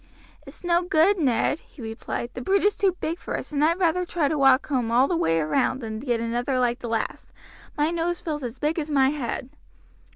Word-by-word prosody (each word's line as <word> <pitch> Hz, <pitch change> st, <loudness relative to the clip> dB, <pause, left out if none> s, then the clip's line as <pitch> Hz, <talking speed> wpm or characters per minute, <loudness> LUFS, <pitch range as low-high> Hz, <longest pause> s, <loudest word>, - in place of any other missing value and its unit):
"It's -, -, -14 dB
no 345 Hz, 0 st, +3 dB
good, 360 Hz, +2 st, +3 dB
Ned," 285 Hz, +1 st, +1 dB
he -, -, -22 dB
replied, 235 Hz, +1 st, -5 dB
"the 250 Hz, -, -6 dB
brute 390 Hz, +10 st, +2 dB
is 410 Hz, 0 st, +3 dB
too 380 Hz, -3 st, +1 dB
big 330 Hz, +3 st, -3 dB
for -, -, -4 dB
us, -, -, -8 dB
and 290 Hz, 0 st, 0 dB
I'd 330 Hz, +3 st, +3 dB
rather 360 Hz, 0 st, +2 dB
try 340 Hz, -4 st, 0 dB
to 315 Hz, -, 0 dB
walk 270 Hz, -1 st, +4 dB
home 255 Hz, -5 st, 0 dB
all 245 Hz, +4 st, +4 dB
the 350 Hz, -, 0 dB
way 165 Hz, -, +2 dB
round 255 Hz, -, +1 dB
than 220 Hz, -3 st, -5 dB
get 240 Hz, -2 st, -1 dB
another 240 Hz, +3 st, -1 dB
like 245 Hz, 0 st, +1 dB
the 240 Hz, -, -6 dB
last. 225 Hz, -1 st, -3 dB, 0.5 s
My 300 Hz, +2 st, +2 dB
nose 345 Hz, +1 st, -1 dB
feels 300 Hz, -3 st, -4 dB
as 245 Hz, +1 st, -5 dB
big 300 Hz, +5 st, -1 dB
as 310 Hz, -1 st, -4 dB
my 270 Hz, -3 st, +4 dB
head." 265 Hz, -2 st, -4 dB
285 Hz, 225 wpm, -25 LUFS, 245-335 Hz, 0.5 s, walk